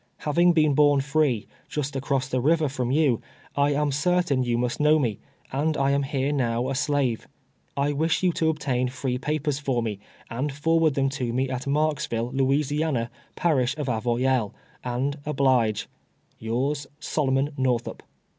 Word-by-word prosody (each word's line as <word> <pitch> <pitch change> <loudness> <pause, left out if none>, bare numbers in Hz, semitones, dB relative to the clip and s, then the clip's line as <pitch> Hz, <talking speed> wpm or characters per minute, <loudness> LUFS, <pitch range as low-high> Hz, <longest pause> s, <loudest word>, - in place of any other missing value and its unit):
" - - -44
Having 170 +4 +4
been 155 -3 +3
born 145 0 +4
free, 135 -5 +1 0.2
just 145 -1 -3
across 135 0 -1
the 130 -1 -1
river 155 +3 +3
from 130 -3 -2
you, 140 -4 +2 0.3
I 145 0 +3
am 145 0 +1
certain 150 -1 +1
you 120 -2 0
must 120 0 -1
know 150 +1 +5
me, 120 -9 -1 0.3
and 150 +3 0
I 135 0 +2
am 140 0 +2
here 140 0 -1
now 125 -3 0
a - - -1
slave. 140 -4 0 0.5
I 145 +1 +1
wish 160 +5 0
you 180 - +4
to 160 -1 +1
obtain 135 -5 0
free 125 -1 -3
papers 150 0 -1
for 130 -5 -1
me, 105 -3 -3 0.3
and 130 +6 -2
forward 160 +1 +2
them 135 0 +2
to 130 -3 -3
me 130 +2 -1
at 130 +1 -4
Marksville, 140 -5 0
Louisiana, 135 -1 0 0.2
Parish 135 -5 +1
of 150 - -2
Avoyelles, 120 0 0 0.3
and 130 +4 -2
oblige 130 -7 +1 0.3
" - - -42
Yours, 135 +6 -2
SOLOMON 140 -2 0
NORTIIUP. 120 -3 0
135 Hz, 165 wpm, -25 LUFS, 125-150 Hz, 0.5 s, know